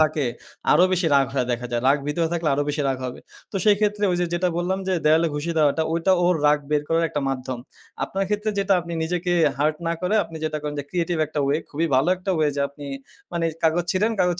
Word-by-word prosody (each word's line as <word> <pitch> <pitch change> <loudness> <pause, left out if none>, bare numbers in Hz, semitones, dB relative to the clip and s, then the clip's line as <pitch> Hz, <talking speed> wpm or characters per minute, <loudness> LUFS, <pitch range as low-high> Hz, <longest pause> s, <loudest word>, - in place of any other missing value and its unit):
থাকে 155 -3 +2 0.5
আরো 175 +5 +6
বেশি 180 -2 +1
রাগ 135 -1 +4
হয়ে 125 -2 +1
দেখা 120 +1 -3
যায়। 120 0 0
রাগ 145 +2 +4
ভিতরে 165 +2 0
থাকলে 165 -2 0
আরো 145 - +1
বেশি 145 0 -1
রাগ 130 -1 -1
হবে। 125 - -6 0.3
তো 195 - -4
সেই 205 -1 +5
ক্ষেত্রে 210 0 +1
ওইযে, 175 0 0
যেটা 180 +1 +1
বললাম 185 +2 0
যে, - - +1
দেওয়ালে 160 +2 +4
খুশি 150 +3 -2
দেওয়াটা 150 +1 +3
ওইটা 170 +3 +2
ওর 180 0 +4
রাগ 150 0 +5
বের 150 -1 +2
করার 165 0 +2
একটা 145 - -2
মাধ্যম। 130 -2 -3 0.5
আপনার 195 0 -2
ক্ষেত্রে 210 +1 0
যেটা 195 0 +2
আপনি 170 0 -8
নিজেকে 175 +2 -1 0.3
হার্ট 155 +1 +1
না 165 - +1
করে 180 +4 0
আপনি 165 - -10
যেটা 155 -1 -1
করেন 150 0 -3
যে, 140 - -3
ক্রিয়েটিভ 175 -1 -1
একটা 150 -1 -3
ওয়ে 140 +2 +2
খুবই 160 +3 -1
ভালো 135 +6 +3
একটা 185 +2 -4
ওয়ে 155 -1 +2
যে, - - 0
আপনি 145 0 -12 0.5
মানি 170 -1 -1 0.2
কাগজ 165 +2 +2
ছিঁড়েন 210 +5 +1
কাগজ 180 -1 +3
165 Hz, 235 wpm, -23 LUFS, 145-180 Hz, 0.5 s, আরো